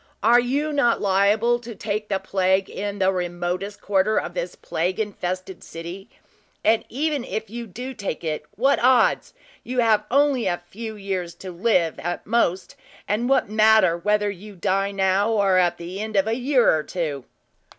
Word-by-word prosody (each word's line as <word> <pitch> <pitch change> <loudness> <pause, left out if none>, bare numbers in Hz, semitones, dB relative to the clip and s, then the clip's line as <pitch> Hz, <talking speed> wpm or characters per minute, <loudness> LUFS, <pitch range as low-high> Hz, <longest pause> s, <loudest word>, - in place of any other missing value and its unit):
Are 235 +3 +6
you 280 +5 -1
not 240 -5 +2
liable 205 +5 +2
to 235 -1 -9
take 210 +1 -3
the 195 - +1
plague 190 0 0
in 205 0 -4
the 190 -1 +2
remotest 180 +2 -3
quarter 205 +2 +1
of 175 - -2
this 175 0 -4
plague 180 +5 -2
infested 185 -3 -4
city? 170 +4 -8 0.5
And 220 +1 +3
even 290 +1 -1
if 220 -3 -5
you 235 0 -6
do 250 +7 -7
take 200 -9 -5
it, 155 -2 -3
what 270 +7 +2
odds? 255 -1 +3 0.3
You 250 +1 -5
have 220 -2 +3
only 275 -4 +2
a 175 -1 0
few 220 +3 -7
years 190 -4 -4
to 185 - -8
live, 175 -3 +1
at 175 +1 -4
the - - -21
most, 190 -6 +1 0.3
and 225 +5 0
what 270 - +3
matter 215 -4 +4
whether 210 +3 +1
you 200 +2 -11
die 195 +3 0
now 195 +1 +1
or 195 -3 +3
at 175 -1 +2
the 175 +3 -7
end 215 0 -5
of 195 0 +3
a 220 - 0
year 255 - +3
or 155 - 0
two?" 150 -6 -4
200 Hz, 180 wpm, -23 LUFS, 185-230 Hz, 0.5 s, Are